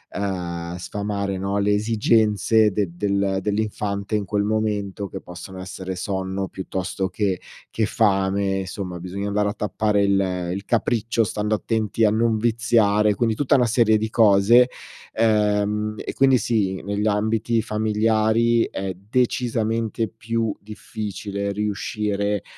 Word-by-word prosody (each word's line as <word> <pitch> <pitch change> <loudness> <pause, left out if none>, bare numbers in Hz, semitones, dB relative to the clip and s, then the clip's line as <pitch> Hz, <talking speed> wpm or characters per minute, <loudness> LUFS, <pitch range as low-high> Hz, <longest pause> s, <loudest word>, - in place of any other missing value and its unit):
uhm, 90 -3 -3
sfamare, 100 +1 -3
no, 100 +1 -2
le 105 +1 +2
esigenze 110 0 +3
de 105 -3 0
del 100 0 0
dell'infante 105 0 -2
in 105 - 0
quel 100 +2 0
momento, 105 -2 -1
che - - -6
possono 90 +1 -10
essere 95 0 -6
sonno, 95 0 -3
piuttosto 95 0 -4
che 95 -1 -1 0.3
che 110 - 0
fame 100 -3 +1
somma, 90 -1 -5
bisogna 95 +3 -5
andare 105 0 +1
a - - -3
tappare 105 0 0
il 95 -3 0
il 100 +1 -5
capriccio, 115 -1 +1
stando 105 +1 -2
attenti 110 0 0
a 105 - +4
non 110 0 +2
viziare. 110 -2 +2
Quindi 115 +1 +1
tutta 145 +3 +2
una 125 - +4
serie 110 -1 +3
di 110 +1 -2
cose, 115 +3 +5 0.4
ehm, 105 -1 +1
e - - -5
quindi 135 -1 +4
sì, 100 -4 0
negli 100 +1 -1
ambiti 110 +2 +1
familiari 110 +2 +2
è 95 -1 -3 0.2
decisamente 115 -2 0
più 110 0 -2
difficile 100 -1 -5
riuscire 105 0 -2
105 Hz, 135 wpm, -23 LUFS, 100-110 Hz, 0.4 s, cose